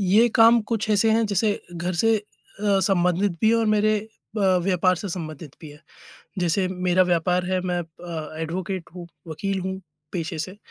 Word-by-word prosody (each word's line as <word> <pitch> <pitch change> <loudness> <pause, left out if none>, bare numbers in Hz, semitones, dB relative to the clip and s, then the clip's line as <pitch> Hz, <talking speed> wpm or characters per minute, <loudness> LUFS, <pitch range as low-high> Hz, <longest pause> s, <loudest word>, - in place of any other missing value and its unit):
ये 205 +5 +4
काम 230 +1 +6
कुछ 220 -1 -1
ऐसे 215 +2 +3
हैं 225 0 +3
जैसे 205 +1 0
घर 175 +2 -3
से 225 +5 +3
अ, 205 -1 -3
संबंधित 180 0 +2
भी 220 - +4
हैं 230 - +4
और 225 -1 +1
मेरे 215 0 +3
अ, 220 0 -10 0.2
व्यापार 185 -1 +2
से 200 - -5
संबंधित 155 -4 -7
भी 155 -3 -10
हैं। 150 +1 -15 0.6
जैसे 180 +2 +1
मेरा 180 0 +2
व्यापार 180 +1 +1
है, 185 0 0
मैं 180 -1 -1
अ, 160 -1 -8
एडवोकेट 185 +2 -4
हूँ, 175 -1 -8 0.2
वकील 190 +5 -3
हूँ 190 +1 -4 0.3
पेशे 165 -2 -4
से। 185 +6 -5
185 Hz, 180 wpm, -24 LUFS, 175-210 Hz, 0.6 s, काम